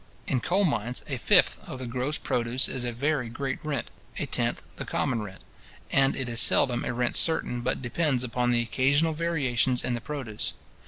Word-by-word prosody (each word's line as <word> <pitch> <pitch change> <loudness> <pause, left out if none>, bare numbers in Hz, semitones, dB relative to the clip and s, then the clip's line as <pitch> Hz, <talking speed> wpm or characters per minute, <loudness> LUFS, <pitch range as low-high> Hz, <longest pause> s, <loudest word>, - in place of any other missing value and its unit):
In 130 - 0
coal 190 +10 +1
mines, 120 - -1
a - - -3
fifth - - +4
of - - -5
the 130 - -6
gross 130 +5 -2
produce 120 +2 +1
is 125 - -3
a 120 - -1
very 130 0 -1
great 135 +3 -3
rent, 145 -5 -3 0.3
a - - -1
tenth - - 0
the - - -4
common 120 -4 -1
rent; 95 -3 -9 0.5
and 135 0 +3
it 135 -2 -3
is 115 -1 0
seldom 120 -2 +4
a - - -2
rent 120 0 -1
certain, 140 -7 +2
but 125 +2 -2
depends 130 0 0
upon 125 0 -1
the 120 -1 +2
occasional 140 +7 +2
variations 135 -7 0
in 125 - -1
the 120 - -3
produce. 130 -6 -4
125 Hz, 195 wpm, -27 LUFS, 120-140 Hz, 0.5 s, fifth